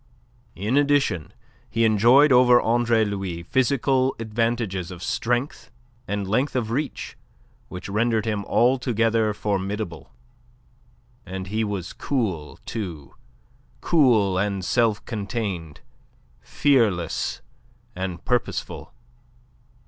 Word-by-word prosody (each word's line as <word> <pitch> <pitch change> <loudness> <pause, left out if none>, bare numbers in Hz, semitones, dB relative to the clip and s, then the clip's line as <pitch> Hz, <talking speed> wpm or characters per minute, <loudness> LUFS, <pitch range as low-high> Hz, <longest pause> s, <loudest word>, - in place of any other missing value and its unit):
In 105 +9 0
addition, 140 - +1 0.4
he 115 0 +1
enjoyed 120 +7 +5
over 125 -1 +6
Andre 115 -1 +2
Louis 95 -4 -4
physical 130 +3 +1
advantages 115 -5 -2
of 90 -1 -9
strength 120 +3 -2 0.4
and 100 -1 -2
length 130 +8 0
of 115 -3 -1
reach, 140 +4 -3 0.5
which 90 0 -8
rendered 110 +2 0
him 105 -2 -1
altogether 115 -3 +2
formidable. 100 -2 -3 1.1
And 95 0 -6
he 110 +2 0
was 100 -5 -4
cool, 100 - -2
too; 85 -10 -6 0.7
cool 110 - +3
and 100 -2 -1
self 115 -2 +1
contained; 100 - -4 0.6
fearless 105 - +1 0.5
and 90 -2 -5
purposeful. 125 -1 -2
110 Hz, 95 wpm, -24 LUFS, 95-120 Hz, 1.1 s, over